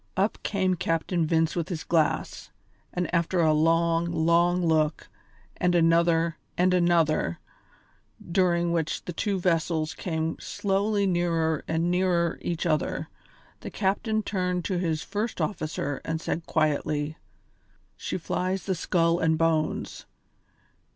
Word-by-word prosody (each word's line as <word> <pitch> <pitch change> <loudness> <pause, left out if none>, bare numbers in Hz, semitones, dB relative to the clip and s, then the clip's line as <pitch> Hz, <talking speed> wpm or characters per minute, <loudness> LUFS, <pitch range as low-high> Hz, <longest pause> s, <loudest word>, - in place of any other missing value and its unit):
Up 200 +3 +1
came 190 -2 0
Captain 165 0 0
Vince 160 0 +1
with 170 -1 -2
his 170 -4 -4
glass, 160 -3 0 0.4
and 180 -1 -2
after 170 +1 +1
a 160 -2 +4
long, 165 +2 +2
long 170 +2 +2
look, 155 -1 +1 0.5
and 180 0 +1
another, 165 0 +3 0.2
and 180 +1 +3
another, 170 - +2 0.8
during 175 -1 +1
which 165 -2 -1
the 175 - -5
two 200 +3 -1
vessels 165 -2 0
came 160 -2 -3
slowly 200 +1 0
nearer 165 -4 0
and 165 +2 0
nearer 180 -2 +1
each 170 -1 -3
other, 155 -3 -1 0.5
the - - -7
captain 215 +2 0
turned 180 -3 -1
to 185 -3 -1
his 160 -3 -1
first 220 +2 -3
officer 155 -6 -2
and 160 0 -2
said 165 0 -4
quietly: 150 -1 0 0.8
"She - - -4
flies 185 +2 -2
the 190 - 0
skull 170 -1 +1
and 160 -1 +2
bones. 160 -1 -1
170 Hz, 130 wpm, -26 LUFS, 160-180 Hz, 0.8 s, a